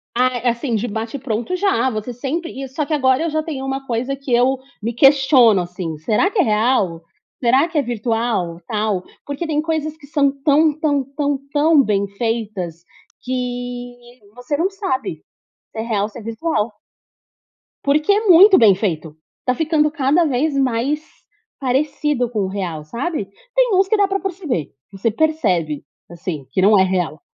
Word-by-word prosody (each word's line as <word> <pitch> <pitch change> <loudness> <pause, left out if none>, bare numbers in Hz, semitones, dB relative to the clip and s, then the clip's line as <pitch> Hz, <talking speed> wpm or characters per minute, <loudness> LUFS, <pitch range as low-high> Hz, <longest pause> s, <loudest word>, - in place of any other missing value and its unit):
Ah, 250 -1 +2
assim, 235 0 -2
de 225 +3 -1
bate-pronto, 230 - -3
já. 345 - +1
Você 220 +2 -4
sempre 300 +8 -3
e - - -5
só 285 +3 -3
que 310 - -3
agora 260 +1 +2
eu 335 - 0
já 310 0 0
tenho 280 -4 -5
uma 270 0 -3
coisa 250 +3 -1
que 275 -2 -8
eu 255 +2 +3 0.2
me 230 +2 -2
questiono, 265 -6 +5
assim: 175 -3 -5
"Será 215 - +1
que 415 - -2
é - - +6
real? 210 -6 +1 0.4
Será 260 +6 +3
que 330 -2 -4
é - - +3
virtual 225 -7 -1
e - - -32
tal?" 210 -4 -1 0.2
Porque 285 +4 -4
tem 300 -1 0
coisas 310 -1 -2
que 290 - -15
são 280 -1 +2
tão, 305 +1 +4
tão, 285 -3 +1
tão, 285 -2 0
tão 295 -1 +4
bem 200 -2 0
feitas 200 -6 -3 0.4
que 245 -1 -5 0.2
você 245 +4 -3
não 350 +6 +1
sabe 380 -10 -3 0.5
se - - -9
é - - -2
real 215 -3 0
ou - - -2
se 220 - -11
é - - -9
virtual. 225 -1 -2 1.1
Porque 300 +8 +3
é 425 +1 0
muito 380 +3 +8
bem 215 -5 +7
feito. 165 -6 -3 0.3
Está 250 - 0
ficando 305 +1 +1
cada 305 +2 +2
vez 285 0 0
mais 270 +4 0 0.5
parecido 275 -1 0
com 220 -3 -3
o - - -2
real, 175 -6 -4
sabe. 235 - -3 0.3
Tem - - +3
uns 380 +1 +3
que 435 - +3
dá 400 - +3
pra 390 0 -2
perceber. 335 - -3 0.2
Você 205 +3 -1
percebe, 195 - 0 0.3
assim, 170 -4 -6
que 185 - +1
não 205 0 +5
é - - +6
real, 180 -5 -1
250 Hz, 180 wpm, -19 LUFS, 215-300 Hz, 1.1 s, muito